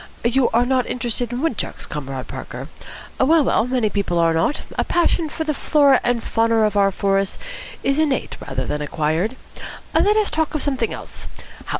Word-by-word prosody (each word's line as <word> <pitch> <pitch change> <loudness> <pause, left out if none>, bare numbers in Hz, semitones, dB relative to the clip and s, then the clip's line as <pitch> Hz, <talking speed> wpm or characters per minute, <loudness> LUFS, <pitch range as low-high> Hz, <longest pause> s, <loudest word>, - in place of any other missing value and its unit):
"You 245 +2 +3
are 235 +2 +2
not 255 0 +1
interested 245 -1 -2
in 245 +1 -3
wood 320 -9 0
chucks, - - -5
Comrade 135 -3 -6
Parker? - - -7 0.5
Well, 310 +4 +5
well, 240 -3 +2
many 250 -3 +1
people 200 -4 -1
are 165 -1 +3
not. 165 - 0
A - - +1
passion 340 -2 +1
for 320 - -3
the 310 -1 -1
flora 280 -2 +4
and 240 -1 0
fauna 225 0 +2
of 210 -1 +2
our 200 -1 +4
forests 195 0 0 0.5
is 275 +2 +1
innate 295 -4 0
rather - - -2
than 150 - -3
acquired. 160 - -1 0.6
Let 420 +1 +4
us 425 -2 +2
talk 315 0 -1
of 305 - -1
something 260 -6 0
else. - - -8
245 Hz, 185 wpm, -21 LUFS, 195-285 Hz, 0.6 s, Well